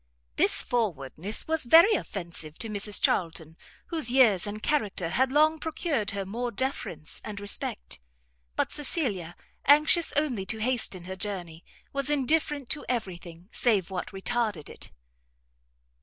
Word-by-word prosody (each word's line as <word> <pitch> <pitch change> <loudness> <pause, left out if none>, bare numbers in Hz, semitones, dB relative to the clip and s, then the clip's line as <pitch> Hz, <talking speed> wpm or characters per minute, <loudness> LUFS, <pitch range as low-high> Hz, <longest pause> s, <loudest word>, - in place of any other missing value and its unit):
This - - +5
forwardness 195 - -1
was 320 -3 0
very 335 - +7
offensive 170 - -4
to 225 - -4
Mrs 205 0 +3
Charlton, 165 -2 0 0.3
whose 315 -8 +1
years 230 -7 +4
and 215 +1 -6
character 210 - -1
had 260 +8 +1
long 310 +2 +3
procured 305 - -1
her 200 -1 -3
more 235 +5 -3
deference 205 - -4
and 210 -1 -6
respect; 200 - -3 0.6
but - - 0
Cecilia, 220 - -1 0.3
anxious 305 +4 +5
only 275 -9 0
to 220 - 0
hasten 220 -6 -2
her 190 +1 -6
journey, 175 -4 -3 0.3
was 275 0 -2
indifferent 295 -1 0
to 300 - -1
every 220 -8 -2
thing, 170 0 -13
save 205 -7 +1
what 180 -2 -4
retarded 205 -4 -2
it. - - -10
215 Hz, 140 wpm, -27 LUFS, 185-275 Hz, 0.6 s, very